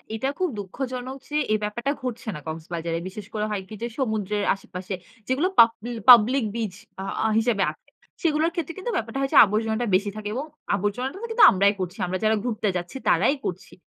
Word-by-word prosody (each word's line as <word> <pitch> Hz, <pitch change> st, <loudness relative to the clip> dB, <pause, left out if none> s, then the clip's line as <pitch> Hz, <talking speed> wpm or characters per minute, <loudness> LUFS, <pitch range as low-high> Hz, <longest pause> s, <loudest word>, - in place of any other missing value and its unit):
এটা 225 Hz, +5 st, -1 dB
খুব 370 Hz, -, +1 dB
দুঃখজনক 255 Hz, +5 st, -5 dB
যে, 300 Hz, -, -1 dB, 0.2 s
এই 215 Hz, -, +3 dB
ব্যাপারটা 240 Hz, +6 st, -1 dB
ঘটছে 240 Hz, -3 st, -5 dB
না 150 Hz, -, -7 dB
কক্সবাজারে। 165 Hz, +1 st, -4 dB
বিশেষ 195 Hz, +1 st, -9 dB
করে 210 Hz, 0 st, -1 dB
হয় 205 Hz, -2 st, -2 dB
কি 220 Hz, -, -8 dB
যে, 235 Hz, -, 0 dB
সমুদ্রের 210 Hz, -4 st, -1 dB
আশেপাশে 190 Hz, 0 st, -7 dB, 0.3 s
যেগুলো 275 Hz, +8 st, +2 dB
পাবলি 230 Hz, 0 st, +5 dB, 0.2 s
পাবলিক 245 Hz, +2 st, +7 dB
বিচ 220 Hz, -5 st, -3 dB, 0.3 s
আ -, -, -5 dB, 0.3 s
হিসেবে 225 Hz, -3 st, +1 dB
আছে। -, -, -27 dB, 0.4 s
সেগুলোর 320 Hz, 0 st, +2 dB
ক্ষেত্রে 330 Hz, -2 st, -3 dB
কিন্তু 430 Hz, +6 st, -3 dB
ব্যাপারটা 225 Hz, +3 st, -3 dB
হয় 270 Hz, 0 st, -1 dB
যে, -, -, +7 dB
আবর্জনাটা 220 Hz, +3 st, -1 dB
বেশি 205 Hz, +2 st, -1 dB
থাকে 215 Hz, -1 st, -5 dB
এবং 265 Hz, +4 st, -2 dB, 0.3 s
আবর্জনাটা 205 Hz, -, -2 dB
কিন্তু 450 Hz, +1 st, +6 dB
আমরাই 200 Hz, +1 st, +4 dB
করছি। 180 Hz, +1 st, -4 dB
আমরা 185 Hz, +1 st, -2 dB
যারা 220 Hz, 0 st, +3 dB
ঘুরতে 225 Hz, -3 st, -1 dB
যাচ্ছি 175 Hz, +6 st, -5 dB
তারাই 195 Hz, -, +4 dB
করছি। 185 Hz, 0 st, -5 dB
220 Hz, 185 wpm, -24 LUFS, 195-255 Hz, 0.4 s, পাবলিক